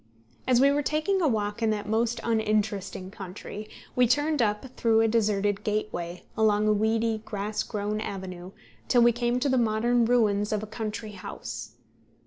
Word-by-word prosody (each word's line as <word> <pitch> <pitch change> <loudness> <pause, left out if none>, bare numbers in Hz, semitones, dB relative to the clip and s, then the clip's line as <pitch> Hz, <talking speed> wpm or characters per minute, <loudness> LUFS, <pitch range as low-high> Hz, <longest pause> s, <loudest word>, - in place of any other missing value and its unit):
As 250 -2 +4
we 275 +2 +6
were 290 +1 +1
taking 310 +7 0
a 325 - +3
walk 210 -3 -1
in 225 - +2
that 210 -1 -2
most 230 +2 0
uninteresting 210 -4 -1
country, 200 +2 -8 0.3
we 250 -1 +4
turned 290 +3 +2
up 215 +4 -1
through 225 -1 +3
a 225 - +4
deserted 205 -3 +1
gateway, 180 -5 -3
along 215 -1 +3
a 215 - +4
weedy, 220 +1 +1
grass 210 0 -3
grown 210 0 -3
avenue, 185 -3 -6 0.4
till 245 -2 +5
we 240 - +6
came 240 +1 0
to 275 - 0
the 260 -2 +3
modern 235 +1 +2
ruins 210 -4 +2
of 215 -1 -1
a - - -3
country 215 0 -5
house. 120 - -7
215 Hz, 170 wpm, -27 LUFS, 205-235 Hz, 0.4 s, we